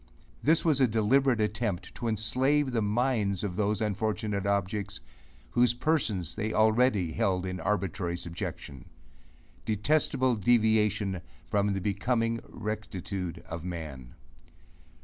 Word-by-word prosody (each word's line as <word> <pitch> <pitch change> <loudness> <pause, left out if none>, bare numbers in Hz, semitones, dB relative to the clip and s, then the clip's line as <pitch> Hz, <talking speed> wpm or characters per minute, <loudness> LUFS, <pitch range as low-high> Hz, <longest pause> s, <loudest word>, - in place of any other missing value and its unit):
This 160 +4 +3
was 150 -4 +3
a 130 - +6
deliberate 120 +3 +3
attempt 105 -3 -1
to 120 - -4
enslave 130 +6 +1
the 115 -2 +1
minds 105 -3 +1
of 95 -4 -3
those 105 +1 0
unfortunate 105 -1 -1
objects, 100 0 -1 0.5
whose 120 -1 +3
persons 120 - 0
they 110 0 -2
already 110 -5 +3
held 90 +3 0
in 90 0 -4
arbitrary 95 -4 -1
subjection: 85 -6 -6 0.8
Detestable 130 +3 +1
deviation 105 -3 +2 0.2
from 100 0 +1
the 95 - -2
becoming 115 +4 0
rectitude 100 -4 -5
of 80 0 -6
man. 75 -8 -7
105 Hz, 115 wpm, -29 LUFS, 95-120 Hz, 0.8 s, a